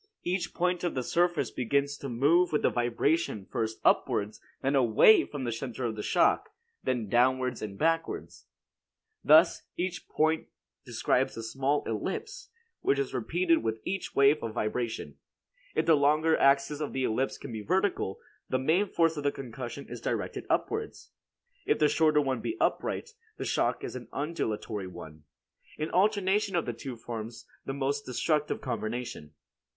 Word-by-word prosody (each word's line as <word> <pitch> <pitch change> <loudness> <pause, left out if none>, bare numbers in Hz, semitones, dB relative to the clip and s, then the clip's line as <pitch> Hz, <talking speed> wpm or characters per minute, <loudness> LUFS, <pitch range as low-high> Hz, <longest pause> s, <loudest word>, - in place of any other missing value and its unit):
Each 175 0 -1
point 180 0 0
of 175 - -1
the 130 - -1
surface 175 -4 +1
begins 140 +3 0
to 140 - -6
move 150 +9 +3
with 150 - 0
the - - +3
vibration 120 - 0
first 110 -2 -3
upwards, 105 +1 +2 0.2
then 135 +2 +2
away 135 - +6
from 145 -3 -6
the 120 - -1
center 120 +2 -4
of 110 -2 -3
shock, - - +2 0.3
then 120 -4 -1
downward 125 +2 +2
and 100 -2 -6
backwards. 165 +3 -1 0.8
Thus, 160 +3 +6 0.2
each 180 0 -3
point 160 +1 +1 0.4
describes - - 0
a 115 - -5
small 135 +5 0
ellipse, 440 - -4 0.3
which 140 - +1
is 140 -1 -2
repeated 165 +7 +1
with 110 0 -2
each 195 0 -3
wave 140 +2 +5
of 115 -1 -5
vibration. 115 +1 -3 0.6
If - - +1
the 165 - +6
longer 155 +2 +4
axis 140 +1 +3
of 150 - -3
the 130 - -1
ellipse 130 +3 0
be 115 -6 -6
vertical, 185 - 0 0.3
the 130 - +1
main 160 +10 +2
force 165 -3 +1
of 145 - -3
the 145 - +2
concussion 130 +1 -7
is - - -8
directed - - -3
upwards; 440 0 -2 0.6
if - - +3
the 150 - +4
shorter 155 0 +3
one 135 -2 -1
be 335 - -3
upright, 460 - -1 0.3
the - - -4
shock - - 0
is - - -5
an - - -7
undulatory 110 - -3
one. 75 -4 -11 0.5
An 155 +1 -3
alternation 200 0 +2
of 170 - +1
the 120 - -3
two 125 +2 -7
forms 115 0 -7 0.2
the 135 - -2
most 140 +1 -1
destructive 150 +4 0
combination. 120 - -4
140 Hz, 160 wpm, -29 LUFS, 120-165 Hz, 0.8 s, away